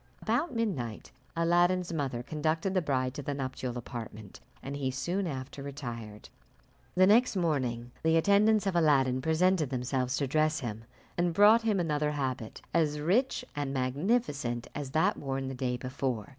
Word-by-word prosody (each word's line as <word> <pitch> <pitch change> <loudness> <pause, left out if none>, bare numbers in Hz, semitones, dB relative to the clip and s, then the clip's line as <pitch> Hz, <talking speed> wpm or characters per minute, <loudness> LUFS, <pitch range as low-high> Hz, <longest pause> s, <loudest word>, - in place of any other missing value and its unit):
About 245 +9 0
midnight 150 - -3 0.2
Aladdin's 175 +1 +2
mother 135 -6 -2
conducted 160 +6 -1
the 185 - +2
bride 130 -4 0
to 145 - -5
the 145 +1 -3
nuptial 130 -2 -4
apartment, 110 -4 -8 0.2
and 140 +1 -5
he 140 -2 -1
soon 175 +8 -2
after 135 -1 -6
retired. 120 -7 -7 0.7
The 185 +1 +6
next 225 +4 +4
morning 130 -9 -1
the 160 0 +3
attendants 205 +4 +4
of 195 -2 0
Aladdin 135 -6 +3
presented 160 0 +2
themselves 130 0 -1
to 140 - 0
dress 155 +3 +1
him, 115 -2 -5 0.3
and 175 -1 +1
brought 210 +4 +7
him 215 -4 +1
another 150 -3 0
habit, 130 -5 -4
as 150 -3 +2
rich 245 - +1
and 140 -2 -2
magnificent 135 - 0
as 145 -2 -5
that 155 +4 +2
worn 135 -1 -3
the - - -4
day 125 -1 -2
before. 125 -3 -3
145 Hz, 155 wpm, -30 LUFS, 130-175 Hz, 0.7 s, brought